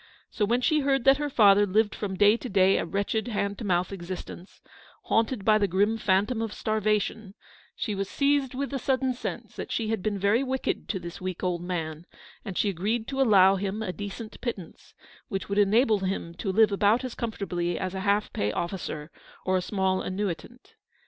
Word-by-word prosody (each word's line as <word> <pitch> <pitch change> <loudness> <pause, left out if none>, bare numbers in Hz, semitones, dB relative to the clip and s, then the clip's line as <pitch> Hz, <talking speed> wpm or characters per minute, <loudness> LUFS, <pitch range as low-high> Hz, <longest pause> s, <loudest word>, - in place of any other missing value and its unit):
So 210 - 0
when 240 +4 +1
she 310 +4 +3
heard 270 -2 +1
that 270 +1 +6
her 295 0 -2
father 205 -5 +5
lived 210 +2 +2
from 195 -2 -4
day 205 +2 +6
to 245 +1 -6
day 195 -1 +4
a - - -2
wretched 200 +4 -1
hand 200 -3 -2
to - - -5
mouth 180 -1 0
ex 175 -3 -8
istence, 185 0 -8 0.4
haunted 225 -2 0
by 215 -1 +5
the 200 - +2
grim 205 +5 +1
phantom 210 +4 +1
of 225 -2 -3
starva 215 -1 +1
tion, 205 0 -6 0.4
she 215 - -3
was 195 0 -3
seized 280 -2 +1
with 280 +1 -3
a 270 - -1
sudden 260 +1 0
sense 245 - -6
that - - -6
she 220 -2 -1
had 220 -3 -1
been 205 +1 -1
very 200 +5 +2
wicked 265 0 -2
to 195 - -1
this 170 0 -8
weak 185 0 -5
old 180 -2 -1
man, 165 -2 -4 0.4
and 195 -5 -6
she - - +2
agreed 215 +6 -1
to 270 -1 -1
allow 195 -5 +6
him 200 +3 -3
a 180 -4 -3
decent 205 +3 -7
pittance, 205 -9 -7 0.3
which 195 0 -4
would 200 +1 +1
enable 215 +2 +4
him 185 -3 -3
to 190 +3 -3
live 215 +2 +4
about 210 +5 +3
as 255 -2 -4
comfortably 180 -6 -3
as 185 -1 -3
a 190 - -3
half 200 +2 0
pay 105 +1 0
officer 170 - -4 0.3
or 185 - +2
a - - 0
small 190 0 0
annuitant. 195 +5 -5
205 Hz, 205 wpm, -27 LUFS, 190-225 Hz, 0.4 s, that